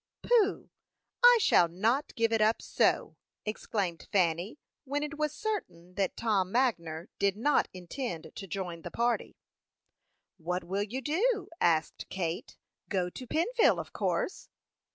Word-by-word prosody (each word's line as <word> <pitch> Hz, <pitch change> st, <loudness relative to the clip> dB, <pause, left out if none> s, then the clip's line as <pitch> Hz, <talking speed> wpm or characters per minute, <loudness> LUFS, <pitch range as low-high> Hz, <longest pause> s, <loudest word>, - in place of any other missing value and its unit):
"Pooh! 440 Hz, -5 st, +2 dB, 0.5 s
I -, -, +9 dB
shall 175 Hz, -, +5 dB
not 220 Hz, -, 0 dB
give 230 Hz, 0 st, +2 dB
it 225 Hz, -, +2 dB
up 215 Hz, +1 st, +3 dB
so!" -, -, +1 dB, 0.3 s
exclaimed 200 Hz, -5 st, -3 dB
Fanny, 180 Hz, -, +1 dB, 0.3 s
when 290 Hz, +1 st, -2 dB
it 300 Hz, 0 st, -4 dB
was 300 Hz, -1 st, +1 dB
certain 300 Hz, -, -4 dB
that 195 Hz, 0 st, -1 dB
Tom 200 Hz, -5 st, +1 dB
Magner 175 Hz, -10 st, 0 dB
did 200 Hz, 0 st, +2 dB
not 290 Hz, +7 st, +3 dB
intend 180 Hz, -, -6 dB
to 195 Hz, -, -8 dB
join 180 Hz, -3 st, -4 dB
the -, -, -6 dB
party. 235 Hz, 0 st, -1 dB, 1.0 s
"What 180 Hz, +2 st, -3 dB
will 190 Hz, +4 st, -2 dB
you 225 Hz, +6 st, -3 dB
do?" 410 Hz, -, +1 dB
asked 160 Hz, -2 st, +1 dB
Kate. 175 Hz, -2 st, -4 dB, 0.3 s
"Go 180 Hz, -3 st, 0 dB
to 255 Hz, -, -9 dB
Pennville, 440 Hz, -, +3 dB
of -, -, -7 dB
course." -, -, -2 dB
210 Hz, 140 wpm, -30 LUFS, 180-285 Hz, 1.0 s, I